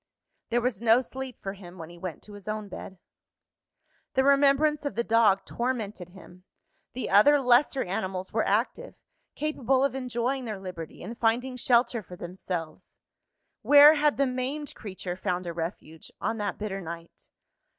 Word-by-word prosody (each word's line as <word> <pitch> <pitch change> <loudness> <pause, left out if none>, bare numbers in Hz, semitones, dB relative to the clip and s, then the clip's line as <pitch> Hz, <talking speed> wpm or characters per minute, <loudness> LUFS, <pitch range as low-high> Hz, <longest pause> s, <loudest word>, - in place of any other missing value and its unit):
There 240 +1 +1
was 240 -4 -1
no 230 +1 +5
sleep 260 0 -7
for 195 - -3
him 185 -2 -12
when 165 -1 -9
he 175 - -13
went 180 -2 -6
to 210 - -12
his 205 -1 -12
own 215 -1 -4
bed. 190 0 -9 1.2
The 265 - +4
remembrance 280 +2 +4
of 285 -8 -3
the 235 - 0
dog 220 -4 +3
tormented 220 -7 -3
him. 180 0 -15 0.5
The 255 - -4
other 290 +9 +6
lesser 260 +1 +3
animals 190 -1 -4
were 220 - +2
active; 235 - -1 0.4
capable 270 -3 +1
of 275 -2 +1
enjoying 255 0 -2
their 215 -4 -5
liberty 180 -4 -8
and 235 - -6
finding 240 +3 0
shelter 240 -1 +2
for 180 -2 -11
themselves. 175 -2 -6 0.6
Where 290 +1 +8
had 300 -1 +2
the 275 - +3
maimed 265 +3 -3
creature 185 -4 -6
found 180 -1 -2
a 170 - -4
refuge, 165 -1 -6
on 225 - -2
that 205 -1 -2
bitter 200 -2 -4
night? 170 -1 -10
225 Hz, 160 wpm, -27 LUFS, 190-260 Hz, 1.2 s, Where